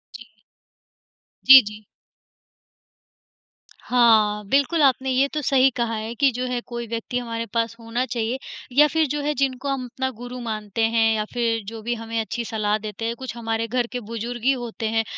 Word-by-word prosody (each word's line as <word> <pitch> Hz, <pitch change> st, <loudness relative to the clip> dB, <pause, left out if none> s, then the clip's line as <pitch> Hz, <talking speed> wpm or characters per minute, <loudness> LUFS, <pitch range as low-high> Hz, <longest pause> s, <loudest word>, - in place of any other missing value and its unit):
जी। 235 Hz, -, -9 dB, 1.2 s
जी, 265 Hz, 0 st, +11 dB
जी। 210 Hz, +1 st, -9 dB, 2.0 s
हाँ, 220 Hz, -4 st, +3 dB
बिल्कुल 285 Hz, +4 st, +2 dB
आपने 265 Hz, 0 st, +3 dB
ये 260 Hz, +2 st, +3 dB
तो 305 Hz, -, -1 dB
सही 270 Hz, -1 st, +4 dB
कहा 235 Hz, -1 st, -1 dB
है 220 Hz, +1 st, -4 dB
कि 275 Hz, +3 st, +4 dB
जो 250 Hz, +2 st, -3 dB
है 250 Hz, -1 st, -1 dB
कोई 235 Hz, -1 st, -5 dB
व्यक्ति 230 Hz, +2 st, -4 dB
हमारे 230 Hz, -1 st, -3 dB
पास 230 Hz, 0 st, 0 dB
होना 235 Hz, +2 st, -2 dB
चाहिए 235 Hz, +1 st, -2 dB, 0.4 s
या 300 Hz, +1 st, +8 dB
फिर 320 Hz, +1 st, +1 dB
जो 295 Hz, +2 st, -2 dB
है, 300 Hz, +1 st, 0 dB
जिनको 270 Hz, +1 st, -1 dB
हम 265 Hz, -2 st, -2 dB
अपना 260 Hz, +2 st, -3 dB
गुरु 245 Hz, +1 st, -7 dB
मानते 215 Hz, -1 st, -4 dB
हैं 225 Hz, -1 st, +3 dB
या 215 Hz, -1 st, -1 dB
फिर 230 Hz, -2 st, 0 dB
जो 225 Hz, 0 st, -7 dB
भी 240 Hz, +2 st, -2 dB
हमें 225 Hz, 0 st, -4 dB
अच्छी 230 Hz, +1 st, -3 dB
सलाह 215 Hz, -2 st, 0 dB
देते 215 Hz, 0 st, -6 dB
हैं, 230 Hz, +1 st, -2 dB
कुछ 255 Hz, -1 st, -7 dB
हमारे 225 Hz, 0 st, -2 dB
घर 240 Hz, +1 st, -1 dB
के 250 Hz, -, -3 dB
बुज़ुर्ग 230 Hz, +1 st, -6 dB
ही 265 Hz, -, +4 dB
होते 235 Hz, -4 st, -3 dB
हैं, 225 Hz, 0 st, +1 dB
235 Hz, 185 wpm, -23 LUFS, 225-255 Hz, 2.0 s, जी